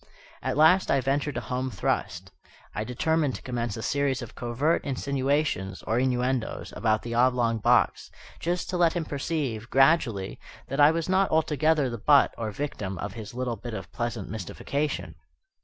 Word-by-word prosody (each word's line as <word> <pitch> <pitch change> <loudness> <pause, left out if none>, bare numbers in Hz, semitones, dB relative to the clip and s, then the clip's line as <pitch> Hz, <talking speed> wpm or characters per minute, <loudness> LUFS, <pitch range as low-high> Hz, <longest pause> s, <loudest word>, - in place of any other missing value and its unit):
At - - -2
last 160 +5 +5
I 135 - +4
ventured 140 +1 -1
a - - -2
home 130 +1 -3
thrust. 95 -7 -2 0.4
I 105 - -2
determined 145 +5 0
to - - -8
commence 120 -4 -3
a 110 - -5
series 140 -3 0
of 115 - -10
covert 130 +7 0
insinuations, 140 -7 -1
or 115 +2 0
innuendos, 125 -1 -1
about 110 -1 +1
the 115 - -5
oblong 120 -2 +2
box, - - +2 0.3
just 175 +1 -2
to 180 - -1
let 170 -2 +4
him 170 -2 -2
perceive, 140 -6 -3
gradually, 135 - +2 0.3
that 135 - -3
I 145 - +8
was 165 0 -1
not 190 +1 +3
altogether 155 -2 +2
the 120 -2 -5
butt, 140 +5 +5
or 115 -2 -3
victim, 100 -6 -4
of 105 +3 -5
his 110 0 -8
little 125 -2 -2
bit 120 -2 -6
of - - -7
pleasant 120 -4 -3
mystification. 110 - -3
130 Hz, 170 wpm, -27 LUFS, 115-150 Hz, 0.4 s, I